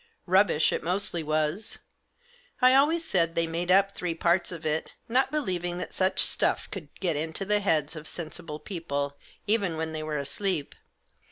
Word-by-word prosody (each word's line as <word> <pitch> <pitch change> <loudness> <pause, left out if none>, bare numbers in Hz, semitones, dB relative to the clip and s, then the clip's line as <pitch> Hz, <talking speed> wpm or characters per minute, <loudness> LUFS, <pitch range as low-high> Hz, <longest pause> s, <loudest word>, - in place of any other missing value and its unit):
Rubbish 185 -4 +3
it - - -1
mostly 180 -1 0
was. 155 +7 -1 0.8
I 255 0 +6
always 315 +5 +3
said 165 - +2
they 170 0 +2
made 170 +2 -3
up 195 +1 +4
three 175 -3 -3
parts 175 +2 +1
of 165 -2 -7
it, 155 +1 -2
not 260 +3 +2
believ 190 - -2
ing 175 0 -2
that 180 - -6
such 190 0 +3
stuff - - +2
could 165 -7 -5
get 175 -5 0
into 160 +5 -2
the 210 +1 +2
heads 160 -6 +1
of 155 0 -7
sensible 155 -2 -5
people, 145 -6 -4 0.3
even 200 -6 +1
when 160 0 -3
they 155 -1 -4
were 155 -1 -3
asleep. 145 +3 -2
175 Hz, 175 wpm, -27 LUFS, 155-195 Hz, 0.8 s, I